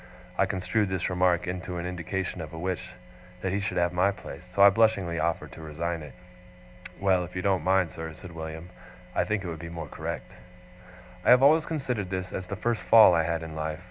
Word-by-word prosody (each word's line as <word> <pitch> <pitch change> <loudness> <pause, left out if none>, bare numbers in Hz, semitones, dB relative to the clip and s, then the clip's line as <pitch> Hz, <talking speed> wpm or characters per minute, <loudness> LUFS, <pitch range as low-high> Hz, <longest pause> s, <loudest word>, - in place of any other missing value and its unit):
I - - +2
construed 100 +2 0
this 95 -1 -1
remark 90 -1 +2
into 90 0 -4
an 85 - -4
indication 90 +1 -3
of 80 0 -8
a - - -7
wish 90 +1 -4 0.5
that 95 - 0
he 100 - +1
should 100 -3 -3
have 85 0 +2
my 90 +3 +3
place, 100 -2 -8
so 100 - +6
I 100 - +9
blushingly 100 -6 +2
offered 80 +1 -1
to - - -11
resign 80 +2 -3
it. 75 - -10 0.8
'Well, 95 -2 +3
if 90 - -9
you 90 - -2
don't 95 -5 +2
mind, 95 -2 +2
sir,' 80 0 -6
said 90 +3 -11
William, 80 +1 -7 0.4
'I - - +1
think 105 -2 -1
it - - -5
would 80 -2 -5
be 85 0 -7
more 85 -1 -6
correct.' - - -6 0.9
I - - +2
have 125 +1 +7
always 155 +3 +5
considered 125 - -2
this 95 0 -3
as 95 - -4
the 100 - -4
first 115 +3 -1
fall 110 -5 +8
I 85 - +4
had 85 0 -1
in 80 -1 -7
life. 80 0 -3
90 Hz, 220 wpm, -27 LUFS, 85-100 Hz, 0.9 s, I